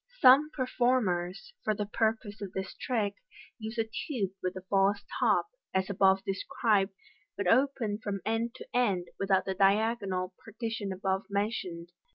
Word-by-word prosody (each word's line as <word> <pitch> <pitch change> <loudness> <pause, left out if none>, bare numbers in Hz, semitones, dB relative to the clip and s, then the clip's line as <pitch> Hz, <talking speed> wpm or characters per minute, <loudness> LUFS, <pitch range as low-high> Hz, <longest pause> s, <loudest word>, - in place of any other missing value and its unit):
Some 275 +4 +7
performers, 245 - 0
for 215 - +1
the 210 - -2
purpose 220 0 -1
of 195 -2 -6
this 190 0 -4
trick, 215 -6 -1 0.5
use 220 +1 -6
a 225 - +3
tube 220 - -3
with 185 0 -2
a 185 - -7
false 200 +1 +2 0.2
top, - - +3 0.3
as 190 +1 +1
above 190 0 +4
described, 195 0 +1 0.4
but 200 - -2
open 230 -1 +2
from 200 -1 -2
end 225 +2 -1
to - - -9
end, 200 -8 +1
without 195 -1 +2
the 190 - -1
diagonal 195 -1 +2
partition 220 -2 -4
above 190 +1 -1
mentioned. 190 -5 -2
205 Hz, 150 wpm, -30 LUFS, 190-230 Hz, 0.5 s, Some